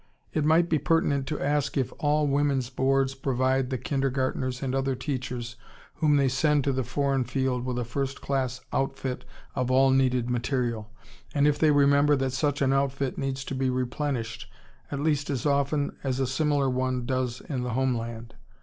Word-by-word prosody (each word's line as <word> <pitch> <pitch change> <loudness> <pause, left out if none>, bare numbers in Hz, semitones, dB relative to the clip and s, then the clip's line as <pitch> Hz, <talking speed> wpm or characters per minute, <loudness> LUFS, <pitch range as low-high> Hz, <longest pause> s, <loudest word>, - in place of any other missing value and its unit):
It 155 - +1
might 160 +3 +4
be 160 -2 +1
pertinent 140 -2 +1
to 150 - -3
ask 145 0 0
if 130 - 0
all 150 -1 +2
Women's 140 -3 +1
Boards 135 +1 +1
provide 130 -1 0
the 130 - -1
kindergartners 130 -1 -1
and 130 -1 -1
other 135 0 0
teachers 125 -3 -4 0.4
whom 150 -2 +3
they 140 -1 +3
send 145 +3 +2
to 140 - +1
the 130 0 0
foreign 135 +2 0
field 130 -1 -1
with 125 -1 -3
a 120 - -1
first 135 +3 -3
class 130 -2 -2
outfit 135 -1 -2 0.3
of 125 -2 -1
all 135 +1 +5
needed 130 -2 +2
material, 120 -3 -1 0.5
and 145 0 +4
if 150 - +2
they 155 - +4
remember 145 0 +5
that 135 -1 -1
such 140 +1 0
an 135 0 +3
outfit 135 -1 0
needs 135 0 -3
to - - -4
be 130 0 0
replenished 120 -3 -2 0.4
at 140 - -2
least 145 -1 0
as 135 -2 -2
often 140 0 +1
as 130 -1 -1
a 135 - +2
similar 140 +1 +1
one 130 -1 -1
does 130 -1 -1
in 135 -4 -4
the 125 -1 -3
home 130 +1 +1
land. 115 0 -6
135 Hz, 185 wpm, -27 LUFS, 125-140 Hz, 0.5 s, all